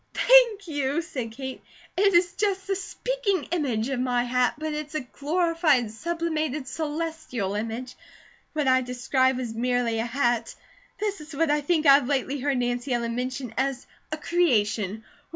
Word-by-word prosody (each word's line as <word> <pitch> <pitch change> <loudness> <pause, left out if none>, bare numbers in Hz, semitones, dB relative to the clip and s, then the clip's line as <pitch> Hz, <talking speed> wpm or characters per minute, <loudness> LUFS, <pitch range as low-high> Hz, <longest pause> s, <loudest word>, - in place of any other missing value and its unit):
"Thank 475 -6 +5
you," 290 +1 -1
said 255 -9 -5
Kate. 265 +2 -7 0.3
"It 395 +1 +3
is 345 0 +4
just 390 -2 -1
'the 390 0 0
speaking 425 0 -2
image' 255 -10 0
of 270 -2 -1
my 250 -1 +1
hat, 250 0 +1
but 310 0 -3
it's 300 0 -5
a 310 - 0
glorified, 305 -2 +1
sublimated, 310 0 -2
celestial 310 -9 -3
image. 230 +4 -4 0.6
What 300 -3 0
I 260 0 +5
described 255 +1 +1
was 245 -3 -4
merely 240 -1 0
a 225 - 0
hat. 240 -2 0 0.4
This 410 -4 -2
is 300 0 -10
what 320 +1 +2
I 295 0 +2
think 315 +1 +1
I 275 - +9
have 275 -2 +4
lately 280 0 -1
heard 275 0 0
Nancy 245 +1 -1
Ellen 235 -1 -1
mention 250 -1 -4
as 265 -1 -1 0.3
a 310 - -2
'creation.' 220 - +1
275 Hz, 165 wpm, -26 LUFS, 245-330 Hz, 0.6 s, I